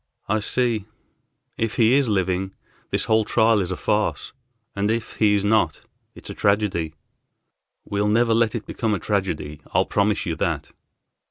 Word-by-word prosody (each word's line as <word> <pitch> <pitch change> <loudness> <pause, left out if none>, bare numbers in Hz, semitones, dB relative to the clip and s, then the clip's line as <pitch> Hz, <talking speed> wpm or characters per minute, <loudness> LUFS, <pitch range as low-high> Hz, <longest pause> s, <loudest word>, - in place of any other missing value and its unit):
"I 110 +2 +1
see. 115 -1 0 0.7
If 115 -1 -1
he 115 +1 +4
is 135 -3 +3
living, 95 -1 -1 0.3
this - - 0
whole 110 0 +3
trial 110 0 +3
is 90 -3 -2
a 95 - -3
farce, 105 0 -1 0.4
and 100 +1 0
if 115 +1 -2
he 105 -2 +4
is 100 - 0
not, 110 +1 +1 0.3
it's - - -9
a - - -5
tragedy." 100 -6 0 0.9
"We'll 100 +1 0
never 115 +2 +3
let 115 -1 +2
it 110 - -4
become 110 -3 -1
a - - -4
tragedy, 85 -7 -2
I'll - - +4
promise 105 0 +1
you 85 - -2
that." - - -2
105 Hz, 165 wpm, -23 LUFS, 95-110 Hz, 0.9 s, he